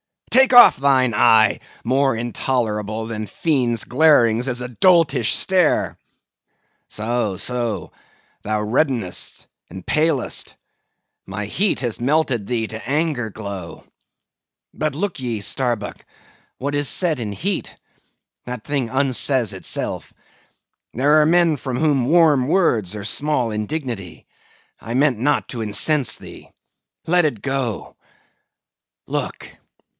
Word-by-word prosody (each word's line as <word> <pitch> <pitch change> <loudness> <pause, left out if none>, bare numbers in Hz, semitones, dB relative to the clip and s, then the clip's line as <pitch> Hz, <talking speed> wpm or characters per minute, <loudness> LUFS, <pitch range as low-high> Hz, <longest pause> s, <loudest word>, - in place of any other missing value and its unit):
Take 265 0 +5
off 245 -1 +9
thine 130 -3 +2
eye! 110 -1 +4 0.2
more 135 +1 +1
intolerable 110 -2 -2
than 110 -1 -5
fiends' 125 - 0
glarings 125 -4 +3
is 125 -1 -3
a 125 - -5
doltish 165 - +3
stare! 185 -4 +1 0.9
So, 110 -3 -2
so; 115 -8 -3 0.5
thou 105 0 -2
reddenest 115 - -1 0.2
and 95 - -10
palest; 155 -4 -1 0.7
my 100 +2 -5
heat 190 - 0
has 120 -4 -3
melted 130 -5 0
thee 115 -2 -1
to 110 +3 -8
anger 145 -6 -1
glow. 100 -5 -8 0.9
But 155 -2 -2
look 175 -1 -3
ye, 120 -5 -3
Starbuck, 120 -1 -2 0.5
what 140 +2 -3
is 145 -1 +1
said 165 -7 0
in 105 -3 -4
heat, 185 - -3 0.7
that 125 -3 -6
thing 140 -5 -2
unsays 130 -3 +2
itself. 95 - -4 0.8
There 145 +5 +4
are - - +3
men 170 -2 +3
from 130 -2 -4
whom 145 -5 +1
warm 150 -4 +4
words 120 - +1
are 105 - -6
small 130 -1 0
indignity. 105 - -5 0.5
I 115 - -6
meant 135 -4 +2
not 145 +5 0
to 120 - -5
incense 115 +4 0
thee. - - -13 0.6
Let 175 0 +3
it 120 -9 -2
go. 135 -5 -3 1.1
Look! - - -4
125 Hz, 120 wpm, -20 LUFS, 110-150 Hz, 1.1 s, off